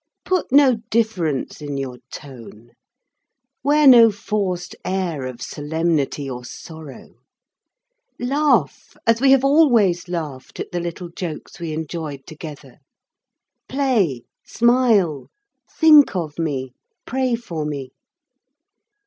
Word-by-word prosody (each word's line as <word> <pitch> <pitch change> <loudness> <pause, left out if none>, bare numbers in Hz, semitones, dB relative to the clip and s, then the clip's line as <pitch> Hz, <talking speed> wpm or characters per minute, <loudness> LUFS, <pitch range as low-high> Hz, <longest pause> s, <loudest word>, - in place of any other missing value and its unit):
Put 370 -7 -1
no 270 -3 +5
difference 180 - -1
into 145 -2 -4
your 130 -2 -5
tone. 120 -5 -11 0.9
Wear 295 +2 +3
no 240 -4 +9
forced 200 -3 -3
air 175 -8 -2
of 125 -2 -8
solemnity 150 -2 -2
or 125 -2 -6
sorrow. 155 +3 -11 1.0
Laugh 285 +4 0
as 230 +1 +3
we 270 0 +6
always 250 - +3
laughed 155 -7 -6
at - - -5
the 175 - -2
little 175 +1 -6
jokes 170 -2 -6
that - - -15
we 165 -2 -4
enjoyed 155 -3 -5
together. 150 -4 -11 0.9
Play, 225 - 0 0.2
smile, 225 - +2 0.4
think 305 - +6
of 165 -4 -4
me, 135 -5 -2 0.3
pray 255 -1 0
for 170 -10 -5
me. 140 -3 -5
170 Hz, 110 wpm, -21 LUFS, 145-235 Hz, 1.0 s, no